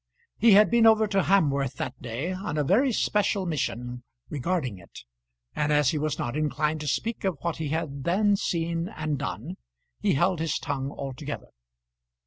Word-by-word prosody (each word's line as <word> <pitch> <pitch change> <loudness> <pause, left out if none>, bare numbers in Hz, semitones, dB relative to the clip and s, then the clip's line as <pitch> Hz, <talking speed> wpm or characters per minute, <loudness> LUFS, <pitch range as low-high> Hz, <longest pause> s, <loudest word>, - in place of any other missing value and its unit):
He 225 0 +6
had 210 +2 +6
been 235 -1 +6
over 220 -1 +6
to 195 -2 +1
Hamworth 140 -9 +2
that 130 0 -5
day 125 +9 -3
on 185 -4 -4
a 150 - +2
very 230 - +3
special 205 -3 +1
mission 125 -6 -3 0.3
regarding 140 - -2
it, - - -13 0.5
and 150 0 0
as 150 -2 +4
he 155 - -1
was 155 0 -1
not 120 +2 -3
inclined 155 0 0
to 150 - -5
speak 225 - -2
of 190 -5 0
what 170 -1 -2
he 160 - -3
had 145 -3 -3
then 200 +5 +3
seen 170 -2 -1
and 155 -7 -3
done, 120 - -5 0.4
he - - +2
held 175 +4 +2
his 160 -2 0
tongue 140 -3 -3
altogether. 140 +1 -6
155 Hz, 175 wpm, -26 LUFS, 140-190 Hz, 0.5 s, He